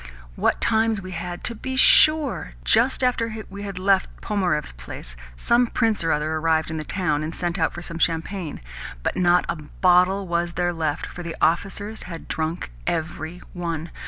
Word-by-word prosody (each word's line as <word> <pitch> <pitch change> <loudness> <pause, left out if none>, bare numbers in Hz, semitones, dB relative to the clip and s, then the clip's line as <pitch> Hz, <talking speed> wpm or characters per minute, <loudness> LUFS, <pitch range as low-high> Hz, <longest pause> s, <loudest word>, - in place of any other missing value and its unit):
What - - +1
times 220 -1 +2
we 185 -1 -8
had, 175 0 -5
to 235 - +2
be 260 +4 -5
sure! 285 - +5
Just 255 +3 +3
after 230 -3 0
we 200 +1 -7
had 200 -2 -6
left 190 0 +3
Pnomarev's 180 -8 -1
place, - - -8 0.2
some 240 - +4
prince 225 -5 +1
or 165 - 0
another 155 +1 0
arrived 160 0 +1
in 160 - -3
the 155 - -3
town, 155 -3 0
and 155 +2 -4
sent 175 +1 -2
out 160 - +2
for 175 - -8
some 170 -1 -6
champagne; 165 0 -1 0.4
but - - 0
not 180 -1 +4
a - - -2
bottle 180 +5 +3
was 170 0 -1
there 175 0 0
left, 155 -3 -2
for 180 - -8
the 170 -1 -5
officers 200 +6 0
had 165 -2 -8
drunk 160 - -3 0.2
every 160 +1 -3
one! 170 -2 -4
175 Hz, 180 wpm, -24 LUFS, 160-200 Hz, 0.4 s, sure